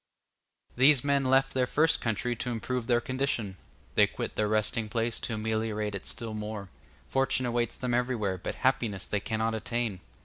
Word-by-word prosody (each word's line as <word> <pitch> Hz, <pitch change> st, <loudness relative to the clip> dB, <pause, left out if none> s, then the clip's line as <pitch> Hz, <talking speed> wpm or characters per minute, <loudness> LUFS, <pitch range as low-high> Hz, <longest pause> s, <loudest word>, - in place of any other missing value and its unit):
These 130 Hz, +1 st, +6 dB
men 140 Hz, -1 st, +2 dB
left 135 Hz, +1 st, +3 dB
their 130 Hz, -1 st, +2 dB
first 160 Hz, +5 st, +3 dB
country 120 Hz, +2 st, -1 dB
to 125 Hz, -, -3 dB
improve 120 Hz, +1 st, -2 dB
their 120 Hz, -1 st, +3 dB
condition; 130 Hz, -8 st, -2 dB, 0.4 s
they -, -, +5 dB
quit -, -, -5 dB
their 105 Hz, -, +1 dB
resting 110 Hz, +1 st, +1 dB
place 115 Hz, 0 st, -1 dB
to 115 Hz, -, -3 dB
ameliorate 110 Hz, -1 st, -1 dB
it 100 Hz, -, -4 dB
still 115 Hz, -2 st, -3 dB
more; 105 Hz, -2 st, -5 dB, 0.4 s
fortune 135 Hz, -1 st, +1 dB
awaits 120 Hz, -1 st, 0 dB
them 125 Hz, -1 st, -2 dB
everywhere, 120 Hz, -6 st, 0 dB
but -, -, -4 dB
happiness 110 Hz, -7 st, +1 dB
they 105 Hz, -, -1 dB
cannot 110 Hz, +1 st, -1 dB
attain. 110 Hz, -2 st, -2 dB
115 Hz, 170 wpm, -29 LUFS, 110-125 Hz, 0.4 s, These